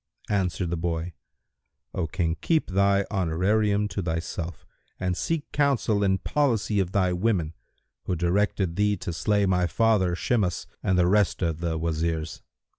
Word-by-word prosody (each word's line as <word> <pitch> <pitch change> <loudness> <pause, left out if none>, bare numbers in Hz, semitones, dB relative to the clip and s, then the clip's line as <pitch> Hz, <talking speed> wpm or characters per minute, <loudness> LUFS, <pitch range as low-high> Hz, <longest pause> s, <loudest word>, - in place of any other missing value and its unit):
Answered 90 -3 0
the 85 - -1
boy, 85 +1 -2 0.8
"O 85 -3 -1
King, 85 -1 -1
keep 160 - +1
thy 100 +1 +3
honorarium 100 +3 +1
to 100 - -3
thyself 85 -1 -4 0.3
and 90 -1 -1
seek 160 - -2
counsel 130 -8 +1
and 95 -1 +1
policy 115 -8 +1
of 95 -2 0
thy 95 -2 +2
women, 90 -4 0 0.5
who 90 - -1
directed 90 0 0
thee 105 0 +2
to 85 - -5
slay 100 +5 +1
my 90 -2 +2
father 95 -1 +2
Shimas 100 -2 0 0.2
and 95 - +1
the 90 - +4
rest 100 0 +2
of 80 -2 -1
the 85 -1 -1
Wazirs." 80 0 -2
95 Hz, 150 wpm, -26 LUFS, 85-105 Hz, 0.8 s, the